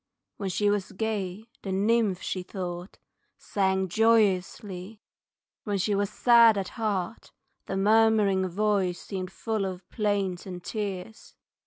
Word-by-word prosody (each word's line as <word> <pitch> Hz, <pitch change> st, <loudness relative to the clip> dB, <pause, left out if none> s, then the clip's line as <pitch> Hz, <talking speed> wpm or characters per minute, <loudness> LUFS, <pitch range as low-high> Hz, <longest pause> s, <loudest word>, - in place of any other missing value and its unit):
When 200 Hz, -2 st, -3 dB
she 205 Hz, +3 st, +2 dB
was 205 Hz, -2 st, -2 dB
gay 205 Hz, -1 st, -3 dB, 0.2 s
the 195 Hz, -, -5 dB
nymph 205 Hz, 0 st, +1 dB
she 185 Hz, -, -2 dB
thought 180 Hz, 0 st, -6 dB, 0.4 s
Sang 190 Hz, -1 st, 0 dB
joyously, 205 Hz, -1 st, +1 dB, 0.6 s
when 205 Hz, -2 st, -1 dB
she 205 Hz, +2 st, 0 dB
was 200 Hz, 0 st, +1 dB
sad 230 Hz, -1 st, +6 dB
at 195 Hz, -2 st, -2 dB
heart 210 Hz, -3 st, -3 dB, 0.4 s
The 195 Hz, -, -2 dB
murmuring 210 Hz, -2 st, +4 dB
voice 190 Hz, -1 st, 0 dB
seemed 185 Hz, -2 st, -5 dB
full 220 Hz, -1 st, -2 dB
of 185 Hz, -1 st, -5 dB
plaint 200 Hz, -4 st, -1 dB
and 180 Hz, -2 st, -7 dB
tears. 205 Hz, 0 st, -5 dB
200 Hz, 130 wpm, -27 LUFS, 185-215 Hz, 0.6 s, sad